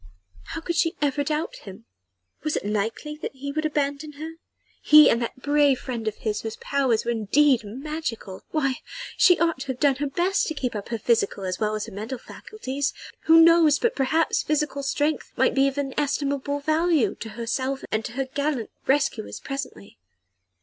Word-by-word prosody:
How - - -6
could 340 +1 -3
she 330 +1 +1
ever 290 0 +1
doubt 305 +2 -2
him? 200 +3 -12 0.6
Was 305 -1 -1
it - - -2
likely 220 +8 -2
that 300 - -6
he 280 +2 -5
would 310 +2 0
abandon 295 0 -2
her? 310 +3 -7 0.5
he 305 0 +8
and 235 - +1
that 240 +2 -5
brave 290 -2 +4
friend 235 -4 -5
of 215 - -1
his 210 -1 -3
whose 220 -1 -5
powers 265 -5 0
were 235 - +1
indeed 235 +4 +3
magical. 240 -4 -5
Why! 275 -4 0 0.4
she 360 -2 +5
ought 330 -4 +1
to 270 - -6
have 260 -2 -4
done 280 -3 +3
her 290 +1 -1
best 355 +7 +1
to 315 - -3
keep 250 -5 -3
up 205 - -5
her 235 - -2
physical 210 -3 0
as 185 -1 -3
well 215 0 0
as 215 - -3
her 225 - -10
mental 220 +6 -5
faculties 280 - -5 0.3
who 325 +1 +8
knows? 330 -3 +6
But 470 +7 0
perhaps 315 +5 +1
physical 300 -2 -1
strength 290 +3 -1
might - - +3
be 275 0 +4
of 275 +1 -3
inestimable 285 0 -1
value 310 - +2
both - - -11
to 225 - -6
herself 260 +3 -2
and 215 +1 0
to - - -6
her 270 +2 -1
gallant 280 -3 -2 0.2
rescuers 270 -5 0
presently. 275 -7 -7
275 Hz, 190 wpm, -25 LUFS, 235-300 Hz, 0.6 s, he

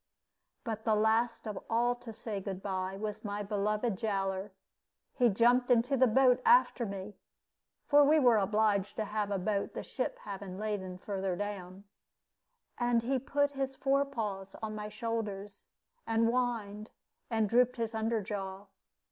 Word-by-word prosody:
But 220 -4 -4
the 220 - +3
last 225 +2 +1
of 210 -3 -5
all 240 +2 +2
to 245 -1 -10
say 215 -2 -5
"good 190 0 -5
by" 190 -1 -3
was 215 +1 -5
my 205 -1 -3
beloved 210 +1 -1
Jowler. 195 -2 -1 0.6
He 245 -3 +4
jumped 240 +4 +3
into 245 +3 +3
the 260 0 +5
boat 250 +1 +4
after 465 - +4
me 195 0 -7 0.7
(for 290 0 +6
we 300 +2 +5
were 245 -5 +5
obliged 205 0 +1
to 220 - -2
have 210 0 -2
a 200 - 0
boat, 200 +2 -2
the - - -4
ship - - -3
having 195 -2 -7
laden 200 -3 -3
further 190 -1 -3
down), 195 -1 -5 1.0
and 240 -1 +2
he 260 +2 +1
put 285 +2 +1
his 270 -1 -3
fore 275 +1 +2
paws 210 -8 -4
on 215 -1 -3
my 210 0 -5
shoulders, 210 -3 -4 0.4
and 225 0 +2
whined 230 -4 -2 0.4
and 220 -3 +1
drooped 245 +3 +3
his 230 -2 -3
under 220 0 0
jaw. 195 -1 -5
215 Hz, 155 wpm, -32 LUFS, 200-240 Hz, 1.0 s, for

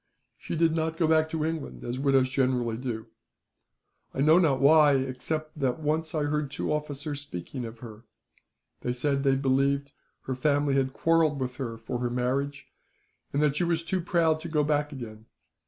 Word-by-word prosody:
She - - -6
did 165 0 +2
not 160 0 -1
go 165 - +2
back 160 0 +3
to 160 -1 -1
England, 160 -1 -4
as 120 +2 -4
widows 135 -2 +3
generally 125 -3 +1
do. 115 -2 -4 1.1
I 135 - 0
know 155 +4 +6
not 145 -7 +3
why, 150 0 +6
except 145 +4 -3
that 130 -3 +1
I - - -16
once 155 +1 -1
heard 150 -1 0
two 145 - -2
officers 145 -1 -4
speaking 125 0 -6
of 115 0 -9
her. 115 -1 -11 0.7
They 125 - -2
said 140 +2 0
that 140 - +2
they 135 - +4
believed 140 +1 +1 0.3
her 130 - -3
family 145 +2 +1
had 135 -1 +1
quarrelled 165 -3 +2
with 125 -1 -3
her, 115 -4 -4
for 115 +2 -5
her 120 0 -1
marriage, 135 +3 -1 0.7
and 145 +2 +1
that 145 -2 +2
she - - +1
was 170 -1 0
too 185 +1 -1
proud 165 -2 +2
to 170 - -7
go 155 -2 +2
back 150 0 0
again. 110 -5 -9
140 Hz, 190 wpm, -27 LUFS, 130-155 Hz, 1.1 s, know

